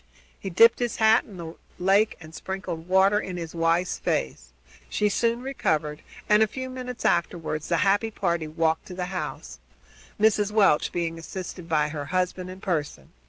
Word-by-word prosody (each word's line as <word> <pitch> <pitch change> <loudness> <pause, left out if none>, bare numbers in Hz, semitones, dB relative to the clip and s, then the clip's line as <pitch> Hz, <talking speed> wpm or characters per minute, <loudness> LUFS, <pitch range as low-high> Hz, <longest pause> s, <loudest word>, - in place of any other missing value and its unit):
He 195 - -5
dipped 230 +6 +6
his 240 -2 -1
hat 220 0 +4
in 200 - -12
the 165 -1 -7 0.2
lake 195 +4 +3
and 160 -1 -12
sprinkled 180 -3 -5
water 190 +2 +4
in 185 -3 -5
his 165 -2 -6
wife's 170 +2 +1
face. 65 -2 -2 0.4
She 210 - +1
soon 235 +3 0
recovered 155 - -1 0.3
and, 210 0 +5
a 220 - +5
few 260 +4 -6
minutes 250 -1 -6
afterward, 165 -2 0
the 170 +2 0
happy 205 +3 +2
party 170 -6 -1
walked 160 +1 0
up - - -15
to 185 - -8
the 180 -1 -2
house, 65 - -5 0.6
Mrs. 210 -1 +3
Welch 200 -8 +3
being 165 -1 -2
assisted 180 +1 -7
by 150 -2 +2
her 145 -1 -5
husband 185 +2 -2
and 185 +1 -10
Pearson. 150 - -3
180 Hz, 175 wpm, -25 LUFS, 165-210 Hz, 0.6 s, dipped